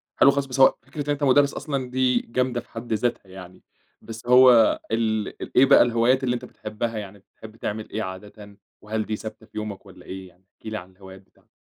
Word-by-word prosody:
حلو 140 - +6
خالص، 140 0 -1
بس 135 0 -5
هو 135 - +6
فكرة 150 - -7
إن - - -7
أنت 145 0 -2
مدرّس 140 +1 +4
أصلًا 135 -4 -4
دي 125 -1 +2
جامدة 125 0 -1
في - - -26
حد 115 0 -5
ذاتها 115 -1 -1
يعني، 95 -1 -12 0.4
بس 115 +1 -10
هو 125 -2 +6
ال 110 -2 0
ال - - -6
إيه 130 - +8
بقى - - +6
الهوايات 120 +3 +2
اللي 125 -1 +1
أنت 125 0 -5
بتحبها، 110 0 -5
يعني 100 -1 -8
بتحب 110 +3 -15
تعمل 110 -1 -5
إيه 110 - -3
عادةً؟ 100 +2 -10 0.2
وهل 110 0 -3
دي 110 - -3
ثابتة 110 +1 -9
في 110 - -14
يومك 105 -1 -6
والّا 95 - -15
إيه 95 0 -8
يعني؟ 90 +1 -24
احكِ - - -29
لي 110 -1 -4
عن 90 -1 -10
الهوايات 95 0 -14
بتاعتك. 95 - -32
110 Hz, 220 wpm, -24 LUFS, 105-125 Hz, 0.4 s, إيه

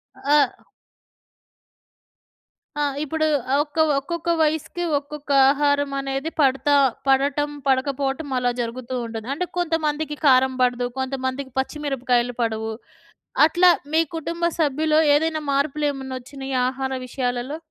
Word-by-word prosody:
ఆ - - -18 0.2
ఆ! 255 - -7 2.1
ఆ! - - +2 0.2
ఇప్పుడు 315 +1 0 0.4
ఒక్క 295 +1 -16 0.2
ఒక్కొక్క 340 +4 -4
వయసుకి 315 +3 0
ఒక్కొక్క 285 0 -7 0.2
ఆహారమనేది 280 0 0
పడతా 275 +1 +3 0.3
పడటం 280 +2 +2 0.2
పడకపోవటం 270 +2 0
అలా 245 -1 +1
జరుగుతూ 240 +2 -5
ఉంటది. 225 0 -7
అంటే 360 +6 -2
కొంతమందికి 315 -3 -1
కారం 260 0 +5
పడదు. 245 0 +1
కొంతమందికి 260 0 -3
పచ్చి 265 +3 -3
మిరపకాయలు 245 -3 0
పడవు. 220 -1 -1 0.8
అట్లా 350 +3 +5 0.2
మీ 320 - +4 0.2
కుటుంబ 335 +2 -5 0.2
సభ్యులో 305 +1 +2 0.2
ఏదైనా 315 +1 +1
మార్పులు 280 +2 0
ఏమన్నా 265 -1 -6
వచ్చినాయ 270 +1 -7 0.2
ఆహార 265 0 -4
విషయాలలో? 250 +2 -3
275 Hz, 110 wpm, -22 LUFS, 260-300 Hz, 2.1 s, కారం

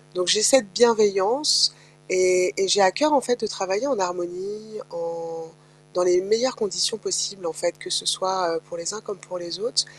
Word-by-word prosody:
donc 180 0 -2
j'ai 210 +4 +4
cette 240 -4 +4
bienveillance 210 - +4 0.3
et 185 0 +2
et 195 - +1
j'ai 200 +3 +4
à 185 - +6
cœur 300 +9 +1
en 280 - +5
fait 245 0 -1
de 215 - -1
travailler 195 +5 -3
en 270 -8 -1
harmonie, 185 +4 -5
en 165 -1 -7 0.5
dans 180 - +2
les 180 0 +3
meilleures 225 +6 0
conditions 185 -1 -1
possibles 185 0 -3
en - - -2
fait 170 +3 -3
que 370 - -10
ce - - -1
soit, 185 -3 0
heu, - - -8
pour 170 - -9
les 170 +4 -4
uns 210 - -8
comme 205 -3 -9
pour 180 0 -10
les 170 -1 -7
autres. 480 +3 0
185 Hz, 205 wpm, -23 LUFS, 175-215 Hz, 0.5 s, à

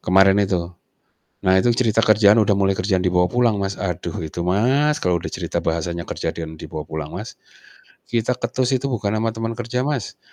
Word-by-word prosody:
kemarin 95 +2 +4
itu. 90 -3 -1 0.7
Nah 95 0 +3
itu 105 +6 +4
cerita 115 -2 +2
kerjaan 105 -2 +5
udah 105 - +1
mulai 100 -1 +2
kerjaan 95 0 0
dibawa 90 -1 +1
pulang, 120 -3 +2
Mas. 95 0 -4
Aduh 90 -3 -3
itu, 85 +2 -5
Mas, 130 - +2
kalau 90 -1 +1
udah - - -5
cerita - - -3
bahasannya 85 +1 -2
kerja - - -4
dan 80 -1 -7
dibawa 75 -1 -6
pulang, 80 -1 -6
Mas, - - -8 0.7
kita 120 +1 +1
ketus 125 +2 0
itu 135 +2 -2
bukan 105 -3 -1
ama 110 +1 0
teman 115 +1 -4
kerja, 120 +1 -3
Mas, 140 -9 -3
100 Hz, 185 wpm, -21 LUFS, 90-120 Hz, 0.7 s, kerjaan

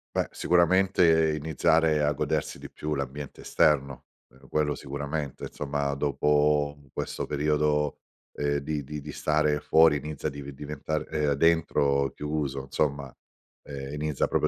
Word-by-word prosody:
Beh - - +1
sicuramente 85 -3 +3
iniziare 80 0 +2
a 75 - +3
godersi - - -2
di - - -9
più 75 0 -4
l'ambiente 70 +1 -5
esterno, 70 -3 +1 0.2
meno 65 +1 -20
quello 75 -1 0
sicuramente, 70 0 -4
insomma, 70 -1 -2
dopo 75 +1 +2
u 70 - -22
questo - - -4
periodo, 75 0 0 0.4
ehm, 70 0 0
di 75 +1 -3
di 75 +3 -6
di 75 +1 -8
stare 75 -1 +1
fuori 80 -1 +5
inizia 75 +1 -4
div 70 -1 -6
diventare 75 +2 -4
ehm, 75 -2 0
dentro 70 -3 +2
chiuso 75 -3 -3
insomma, 70 -1 -2 0.5
ehm, 70 0 -7
inizia 75 -2 -1
proprio - - +1
75 Hz, 135 wpm, -27 LUFS, 70-75 Hz, 0.5 s, fuori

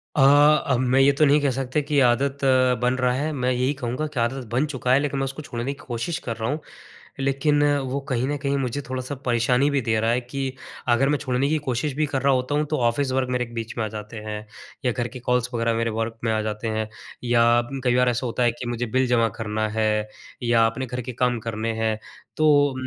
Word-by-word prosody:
अ, 150 - +3
अब 145 -2 +5
मैं 135 - +4
ये 140 +1 +6
तो 155 - +6
नहीं 145 +1 +5
कह 140 - +2
सकता 135 +2 -1
कि 145 +1 -3
ये 140 - +5
आदत 135 +3 +2 0.4
बन 125 +1 +2
रहा 125 -1 +2
है, 150 +4 -1
मैं 130 -2 0
यही 125 +3 +1
कहूँगा 135 +3 -3
कि 130 - -2
आदत 120 +2 -1
बन 125 +5 +2
चुका 130 -4 -2
है 135 - +5
लेकिन 140 -1 -2
मैं 135 - 0
उसको 135 +3 -5
छोड़ने 120 -4 -5
की 140 +1 -4
कोशिश 120 +7 -3
कर 115 -2 -2
रहा 115 +2 -2
हूँ। 150 - -1 0.6
लेकिन 140 +2 +2 0.2
वो 135 +2 -2
कहीं 130 0 0
न 145 +1 -1
कहीं 140 0 +1
मुझे 135 +1 -2
थोड़ा-सा 130 +2 -4
परेशानी 125 +3 +2
भी 140 -2 +1
दे 110 -2 +1
रहा 115 +1 +1
है 125 - +1
कि 130 +2 -4 0.4
अगर 125 +3 +3
मैं 150 - +2
छोड़ने 135 0 0
की 155 - +2
कोशिश 130 +3 -1
भी 155 +1 +1
कर 135 -2 -2
रहा 140 0 +3
होता 130 +3 0
हूँ, 150 - +1
तो 155 +1 -2
ऑफ़िस 125 +3 +1
वर्क 130 -1 0
मेरे 125 -1 0
बीच 115 0 -5
में 115 - 0
आ - - -2
जाते 105 +1 -8
हैं 105 0 -5 0.4
या 125 - +3
घर 120 +1 -2
के 125 - -9
कॉल्स 125 0 0
वरग़ैह 115 -1 0
मेरे 115 0 0
वर्क 115 0 -2
में 110 - +1
आ 110 - 0
जाते 105 +1 -3
हैं 110 0 -2 0.3
या 120 0 +4
म 135 - -3
कई 125 -1 +2
बार 125 0 +4
ऐसा 125 +1 -1
होता 120 +1 -1
है 120 - +4
कि 120 +1 -8
मुझे 120 0 -2
बिल 130 +3 +1
जमा 120 -2 +3
करना 110 -1 -2
है 110 -1 +1 0.4
या 115 -1 +4
अपने 130 +4 -3
घर 125 +1 -4
के 125 +2 -6
काम 125 0 0
करने 115 0 -3
हैं 110 -1 +2
उम, - - -5 0.4
तो 145 -3 +4
125 Hz, 250 wpm, -24 LUFS, 115-140 Hz, 0.6 s, ये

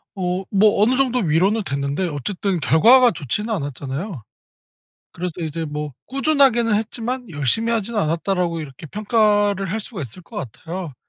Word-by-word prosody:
어 185 0 -2
뭐 205 +1 +4
어느 245 +4 +4
정도 255 -2 +2
위로는 190 +5 +2
됐는데 140 +4 -2
어쨌든 175 +5 -2
결과가 235 +11 +6
좋지는 205 - -3
않았잖아요. 140 - -5 0.9
그래서 180 0 -4
이제 160 0 -3
뭐 150 0 -4 0.2
'꾸준하게는 270 -5 +3
했지만 235 +3 -3
열심히 165 - +1
하진 225 0 -1
않았다.'라고 170 0 0
이렇게 140 +1 -10
평가를 205 - +1
할 220 - -1
수가 205 -3 -7
있을 140 - -7
것 210 +6 -15
같아요. 165 - -6
190 Hz, 350 characters per minute, -21 LUFS, 160-225 Hz, 0.9 s, 결과가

